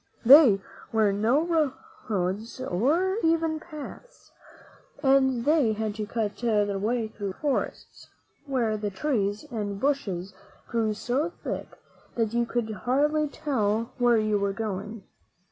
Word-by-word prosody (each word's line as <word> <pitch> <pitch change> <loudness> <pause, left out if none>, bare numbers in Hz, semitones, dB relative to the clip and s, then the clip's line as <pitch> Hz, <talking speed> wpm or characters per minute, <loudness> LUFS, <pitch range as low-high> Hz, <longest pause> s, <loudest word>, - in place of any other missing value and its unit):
There 265 -5 +9 0.3
were 215 -3 +3
no 285 - +2 0.3
roads 200 +4 -2
or 290 - +1
even 325 -1 +1
paths, 330 - -11 0.7
and 265 -3 +3
they 290 -7 +3
had 215 0 -2
to 210 0 -5
cut 215 -3 -2
their 210 -4 +1
way 225 +2 0
through 205 -3 -5
great - - -24
forests, 290 -3 -3 0.4
where 235 -5 0
the 210 0 -2
trees 205 -2 -1
and 205 -3 -3
bushes 200 -10 -1 0.3
grew 220 -2 0
so 265 +9 -1
thick - - -5 0.4
that 225 -2 0
you 235 0 +1
could 235 -2 -2
hardly 290 +8 +1
tell 230 -6 -1
where 240 -1 +4
you 215 -1 +1
were 200 0 0
going. 210 0 -5
230 Hz, 130 wpm, -26 LUFS, 210-280 Hz, 0.7 s, There